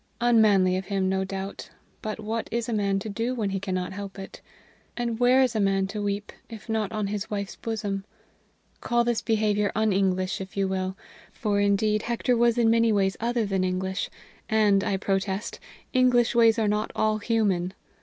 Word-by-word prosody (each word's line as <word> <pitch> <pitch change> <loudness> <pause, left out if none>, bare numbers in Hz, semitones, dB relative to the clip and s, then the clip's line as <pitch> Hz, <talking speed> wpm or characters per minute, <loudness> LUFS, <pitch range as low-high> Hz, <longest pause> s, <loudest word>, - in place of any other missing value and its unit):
Unmanly 210 -6 +4
of 190 - -4
him, 195 -2 0
no 190 0 0
doubt, 195 +1 -6 0.3
but 215 0 -4
what 220 +1 -3
is 235 0 -1
a 235 - -2
man 200 -2 +1
to 195 - -4
do 230 +4 -2
when 210 -5 -1
he 195 - -1
cannot 185 -1 -3
help 200 0 -7
it? 195 - -9 0.6
And 235 -2 -2
where 250 +2 +5
is 250 -3 0
a - - +1
man 195 -1 +2
to 210 +1 -4
weep 205 0 -3 0.2
if 225 -1 -10
not 220 -3 -1
on 215 -2 -2
his 200 0 -3
wife's 200 -2 -4
bosom? 210 -4 -3 0.8
Call 240 -1 +1
this 235 -1 0
behavior 210 -2 +1
un 220 -1 +2
English, 185 -1 0
if 190 +1 -9
you 195 -1 +2
will; 190 0 -2 0.3
for, 205 -2 -1
indeed, 205 +1 +2
Hector 240 +2 0
was 235 0 +3
in 230 -2 +4
many 230 0 +3
ways 195 -2 +2
other 235 0 0
than 195 -2 0
English, 185 +1 -2 0.4
and, 210 -3 +3
I 195 - 0
protest, 195 +1 -2 0.3
English 250 -2 +4
ways 230 -2 +5
are 220 -2 +1
not 210 +1 0
all 215 0 +1
human. 200 -5 0
210 Hz, 190 wpm, -26 LUFS, 195-225 Hz, 0.8 s, where